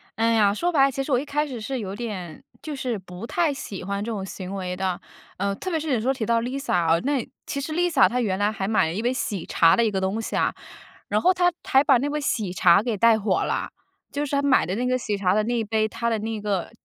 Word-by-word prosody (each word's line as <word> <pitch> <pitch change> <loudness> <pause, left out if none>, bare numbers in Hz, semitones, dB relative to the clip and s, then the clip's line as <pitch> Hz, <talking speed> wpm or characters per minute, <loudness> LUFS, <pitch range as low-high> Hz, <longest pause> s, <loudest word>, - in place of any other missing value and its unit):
哎 230 +1 +2
呀， 205 -2 +4
说 350 +11 0
白 275 -4 +5
了， 275 - +1
其 270 +1 -2
实 280 - -5
我 250 - +4
一 290 - -5
开 295 +1 -1
始 250 -4 -6
是 260 +3 -3
有 195 -2 -5
点 190 -9 -6 0.2
就 305 -2 -5
是 250 -4 -2
不 180 +3 -9
太 335 -5 +1
喜 200 -9 -7
欢 200 +1 -3
这 230 - -4
种 195 -3 -4
行 190 0 -7
为 180 -1 -3
的。 185 -1 -2 0.4
呃， 200 +1 -1
特 370 - -5
别 325 -2 0
是 300 -3 -2
有 225 - +1
时 250 - -3
候 270 - +3
提 230 -5 -3
到 230 0 +2
Lisa， 245 -9 -1
哦， 165 - +4
那 280 -4 0 0.2
其 280 - -3
实 310 +2 -4
Lisa 345 -4 +4
她 250 - -1
原 190 -4 0
来 205 +1 +2
还 195 -2 -3
买 210 -7 +2
了 160 - -3
一 210 - -2
杯 245 +2 +1
喜 205 -8 -3
茶 165 0 +4
的 235 - +3
一 215 - +1
个 190 -1 -1
东 195 +4 -1
西 - - -4
啊， - - +1 0.5
然 - - +1
后 365 +2 +4
她 355 -1 +3
还 270 +1 +4
把 270 -4 +5
那 285 +4 -1
杯 300 +1 -2
喜 215 -9 -1
茶 175 +1 +5
给 230 -4 -1
带 230 +1 +5
火 200 -3 +1
了。 - - -2 0.4
就 290 +1 -2
是 285 - -2
她 280 - +2
买 280 -2 +3
的 185 - -2
那 245 +2 -1
个 255 0 +2
喜 210 -4 -2
茶 185 -2 +2
的 215 0 +2
那 240 +2 -1
一 225 - 0
杯， 220 0 0
她 235 +2 -2
的 225 - 0
那 220 0 -4
个， 200 -3 -2
225 Hz, 330 characters per minute, -24 LUFS, 200-270 Hz, 0.5 s, 白